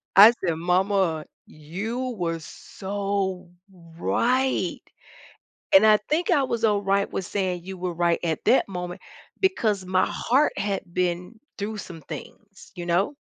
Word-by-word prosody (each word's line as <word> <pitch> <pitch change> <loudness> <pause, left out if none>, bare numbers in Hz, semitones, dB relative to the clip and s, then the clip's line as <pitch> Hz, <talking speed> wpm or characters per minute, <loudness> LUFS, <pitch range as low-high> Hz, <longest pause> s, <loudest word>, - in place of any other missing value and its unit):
I 205 +4 +10
said, 185 -8 -2
"Mama, 180 -2 +1 0.2
you 220 +12 -5
were 165 -2 -2
so 195 +1 -4 0.5
right," 255 +7 +1 1.0
and 195 +3 +8
I 215 -1 +7
think 325 +3 +1
I 280 - +4
was 235 -3 -2
alright 200 -2 +2
with 190 - -3
saying 185 -4 -2
you 190 +1 -7
were 180 0 -3
right 170 0 +1
at 160 -2 -2
that 255 - +4
moment, 180 -1 -5 0.4
because 220 - +1
my 185 0 +2
heart 275 +5 +1
had 200 -1 -1
been 180 +4 -2 0.2
through 210 +2 -4
some 170 -4 -8
things, 200 +7 -11
you 175 -1 -6
know? 180 +10 +1
195 Hz, 140 wpm, -25 LUFS, 180-215 Hz, 1.0 s, I